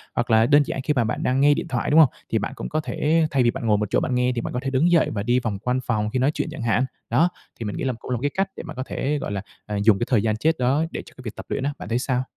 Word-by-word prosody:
Hoặc 120 +1 -1
là 110 +1 +5
đơn 145 +2 +5
giản 135 - -3
khi 150 - 0
mà 125 - +2
bạn 110 - -2
đang 130 +1 +1
nghe 145 +1 +6
điện - - -3
thoại, 120 -3 -2
đúng 155 - +6
hông? 150 -6 +7 0.2
Thì 110 - +1
bạn 105 +5 -3
cũng - - -6
có 155 - 0
thể 155 +2 +1
thay 135 -3 +3
vì 120 - +3
bạn 115 - -6
ngồi 105 -2 +3
một 105 -1 -2
chỗ - - +3
bạn 130 - -1
nghe, 125 0 +2
thì 120 - -1
bạn - - -5
có 125 - -1
thể 135 - -1
đứng 140 +6 +2
dậy 170 -2 +4
và 100 -2 -3
đi 120 +2 +2
vòng 110 -5 -3
quanh 125 +3 0
phòng 105 -4 -1
khi 130 - -1
nói 135 +3 +3
chuyện - - -2
chẳng 160 -5 -7
hạn. 120 +3 +2 0.2
Đó, 170 +3 +3 0.3
thì 115 - -4
mình 105 - -4
nghĩ - - -3
là 130 -2 0
cũng - - -8
là - - +2
một - - -8
cái 145 0 0
cách 195 0 0
để - - -6
bạn 160 -2 -8
có 130 - -3
thể, 145 +2 -1
gọi - - -4
là, 100 - -2 0.2
à, 105 - -4
dùng 105 -3 +5
cái 120 - 0
thời 115 -6 +3
gian 110 -1 0
chết 160 +6 +1
đó 135 +6 +2
để - - -4
cho - - -15
cái - - -10
việc 110 - -5
tập - - -8
luyện 135 - -2
á, 145 +1 -1
bạn - - -7
thấy 115 +2 +1
sao? 130 -1 0
125 Hz, 365 wpm, -23 LUFS, 115-145 Hz, 0.3 s, hông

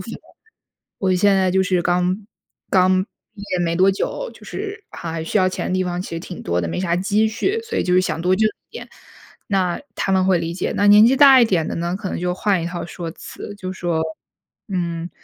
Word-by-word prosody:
房， - - -8 0.9
我 190 -2 +1
现 200 +2 +4
在 185 -1 +2
就 190 +1 +2
是 180 -1 +1
刚 180 +3 0 0.5
刚 185 0 +4
毕 210 0 -17
业 - - 0
没 165 0 -1
多 185 +2 +4
久， - - -3
就 - - -15
是 415 +1 -6
还 165 -1 -6
还 160 -1 -4
需 210 - 0
要 185 -1 +3
钱 185 - -4
的 - - -2
地 185 - +1
方 175 0 -3
其 - - -9
实 165 - -3
挺 180 0 -8
多 85 +1 0
的， 85 - -2
没 80 - -3
啥 175 -2 0
积 205 +4 +1
蓄， 385 - -1
所 455 0 -3
以 - - 0
就 180 - +1
是 185 - +5
想 165 -3 -2
多 180 +2 +2
挣 215 +1 +3
一 - - -16
点， - - -8 0.6
那 185 -3 0
他 - - -2
们 185 -1 +3
会 185 -2 +3
理 165 0 -3
解。 185 - -2
那 205 - +2
年 210 +2 +8
纪 260 +3 +3
大 270 -2 +8
一 - - +6
点 180 -8 +1
的 - - -3
呢， 170 +1 -2
可 195 -2 -5
能 - - -3
就 180 0 -1
换 195 -1 +1
一 - - -3
套 175 0 -5
说 170 0 -6
辞， 205 - -9
就 185 -2 -5
说， 175 -3 -2 0.7
嗯， 170 -3 -3
185 Hz, 260 characters per minute, -20 LUFS, 175-205 Hz, 0.9 s, 年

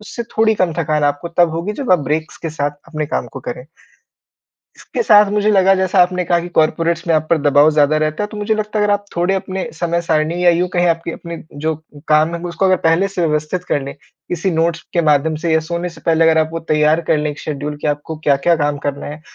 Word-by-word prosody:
उससे 215 +3 -6
थोड़ी 220 0 +3
कम 185 -5 0
थकान 155 -2 0
आपको 145 +3 -1
तब 170 0 +2
होगी, 170 +6 -3
जब 255 -4 -1
आप 180 - +5
ब्रेक्स 150 +3 -3
के 165 - -3
साथ 145 -2 -2 0.2
अपने 155 -1 -3
काम 130 - -2
को 135 - -7
करें। 125 0 -6 1.1
इसके - - -4
साथ 210 - +5
मुझे 210 0 +2
लगा, 195 -1 +4
जैसा 190 0 +2
आपने 180 0 0
कहा 175 0 +2
कि 175 - -6
कॉर्पोरेट्स 165 +2 +1
में 165 - +2
आप 155 0 +1
पर 170 - +4
दबाव 145 +1 +5
ज़्यादा 150 0 +3
रहता 155 +5 -1
है, - - -1
तो 210 - -10
मुझे 210 +1 0
लगता 215 0 -3
है, 210 - +2
अगर 205 - +2
आप 205 0 -4
थोड़े 180 +3 +1
अपने 190 0 -4
समय 170 +1 -1
सारणी 165 +1 0
या 175 - +7
यूँ 175 +2 +1
कहें, 175 0 +1
आपकी 165 0 -1
अपने 170 -1 -8 0.3
जो 160 0 +1 0.3
काम 155 +2 +3
है, 170 - -5
ग 180 - -4
उसको 175 +3 -2
अगर 185 0 +4
पहले 175 +5 +3
से 180 -3 -1
व्यवस्थित 155 +4 -2
कर 145 - 0
लें, 140 - -7 0.3
किसी 175 +2 -1
नोट्स 165 0 0
के 175 - +2
माध्यम 155 0 +2
से 170 -2 0
या 160 - +3
सोने 170 +2 -4
से 170 - -14
पहले 165 0 +3
अगर 160 0 +4
आप 155 0 +2
वो 165 - -3
तैयार 155 +1 +3
कर - - +4
लें 150 0 -1
एक 145 - -9
शेड्यूल 150 0 -5
कि - - -1
आपको 145 +2 -3
क्या-क्या 145 +4 +3
काम 145 -2 -1
करना 140 0 -3
है, 150 +1 -7
165 Hz, 250 wpm, -17 LUFS, 155-180 Hz, 1.1 s, या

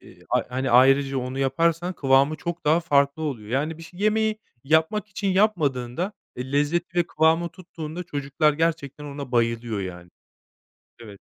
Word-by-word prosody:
eee, - - -17
ay - - +2
hani, 130 +1 -2
ayrıca 135 +2 +5
onu 130 +1 -4
yaparsan 165 +6 +1
kıvamı 140 +1 +3
çok 170 0 -5
daha 155 +3 +4
farklı 140 -2 +2
oluyor. 120 -9 -4
Yani 150 +6 -1
bir - - -10
ş 175 +2 -13
yemeği 215 +1 +1 0.3
yapmak 160 +8 +2
için 200 0 -3
yapmadığında, 175 - +1 0.2
eee, 130 +2 -6
lezzeti 170 +5 0
ve 175 - +2
kıvamı 160 +2 +2
tuttuğunda 170 -1 -8
çocuklar 145 -1 0
gerçekten 150 -2 -2
ona 140 -3 -7
bayılıyor, 115 -2 0
yani. 90 -2 -7 0.9
Evet. 105 -4 -12
150 Hz, 155 wpm, -24 LUFS, 130-170 Hz, 0.9 s, ayrıca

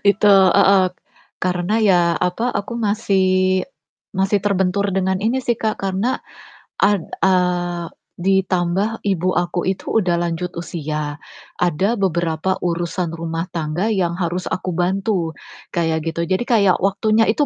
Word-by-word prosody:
itu 205 +1 +3
heeh, 195 0 +5 0.6
karena 180 +2 -1
ya, 190 -3 +5 0.2
apa, 180 +9 -1
aku 210 -2 -3
masih 205 -3 +1 0.9
masih 195 +2 +2
terbentur 200 0 +1
dengan 190 0 0
ini 225 +5 +1
sih 240 - +2
Kak 220 -1 0
karena, 195 +6 -1 0.6
ad 200 0 +3 0.2
eee, 175 -2 +1 0.3
ditambah 190 +1 +1 0.2
ibu 185 -2 +1
aku 175 0 0
itu 190 - -3 0.2
udah 180 -3 +1
lanjut 175 +1 -2
usia, 155 -3 -4 0.5
ada 175 +2 +2
beberapa 175 -2 0
urusan 175 0 -1
rumah 165 0 -3
tangga 165 +4 -1
yang 175 -3 0
harus 180 +1 -1
aku 185 - -2
bantu, 185 -1 0 0.4
kayak 160 -2 0
gitu. 170 +1 -2
Jadi 185 +4 0
kayak 205 -6 +3
waktunya 215 +3 +2
itu 290 +6 +1
185 Hz, 130 wpm, -20 LUFS, 175-200 Hz, 0.9 s, heeh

